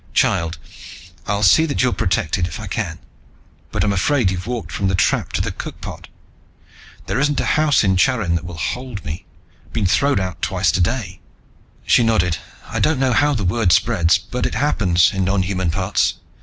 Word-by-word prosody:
"Child, 85 -1 +1 0.7
I'll 100 +1 0
see 160 - +5
that 140 - 0
you're 125 - +2
protected, 85 0 0
if 90 - -7
I 105 - -6
can. 90 -4 -3 0.7
But - - 0
I'm 100 - +1
afraid 100 +1 +2
you've 90 +2 -5
walked 120 -3 -4
from 100 - -1
the 95 - +1
trap - - +1
to - - +1
the - - -2
cookpot. - - -8 1.0
There - - -1
isn't 145 +1 +1
a - - 0
house 155 -4 +3
in 95 -2 +2
Charin 105 -3 +2
that 85 -1 -1
will 85 -2 -8
hold 125 +3 -4
me. 80 +2 -6 0.4
I've - - -25
been 105 - 0
thrown 140 +7 +2
out 95 -2 -4
twice 90 -3 +1
today." 95 - -1 0.7
She - - +4
nodded. 90 -8 +1 0.3
"I - - -3
don't 155 -2 +2
know 130 -2 +2
how 145 +3 +3
the 105 -6 -2
word 95 +1 +1
spreads, 85 -3 +3
but 125 - -3
it - - -6
happens, 95 -11 +2
in 95 -1 -1
nonhuman 95 -2 0
parts. 80 - 0
95 Hz, 185 wpm, -20 LUFS, 90-125 Hz, 1.0 s, see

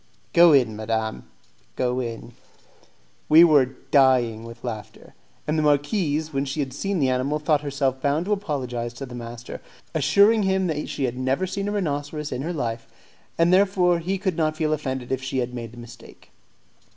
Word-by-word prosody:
"Go 170 0 +7
in, 125 -7 +3
madam, 110 0 -3 0.5
go 125 0 0
in." 120 -1 -6 1.0
We 160 +2 +9
were 150 -6 +5 0.2
dying 125 -5 +3
with 115 0 -11
laughing; 110 -4 -7 0.3
and 155 +1 0
the - - +2
marquise, 150 +1 0
when 135 0 0
she 140 +2 -4
had 135 -3 -2
seen 195 +7 -2
the 135 -5 +2
animal, 130 +4 0
thought 150 -1 +1
herself 140 -2 -1
bound 145 +4 0
to 210 - -3
apologize 125 - -3
to 135 - -6
the 125 - -11
master; 120 0 -8 0.3
assuring 200 +9 +4
him 190 -1 +1
that 155 -4 -3
she 140 - -3
had 125 -1 -2
never 130 +8 0
seen 200 +2 -3
a - - -1
rhinoceros 150 -5 -3
in 125 - -3
her 165 +5 -3
life, 115 -7 -4 0.5
and 170 +2 +3
therefore 185 -3 +3
he 185 +4 -2
could 190 -3 -2
not 155 -1 0
feel 155 -1 0
offended 130 -4 -4
if 130 0 -1
she 130 0 -4
had 125 -1 -2
made 120 -1 -7
a - - -15
mistake. 120 -1 -14
140 Hz, 185 wpm, -24 LUFS, 125-165 Hz, 1.0 s, We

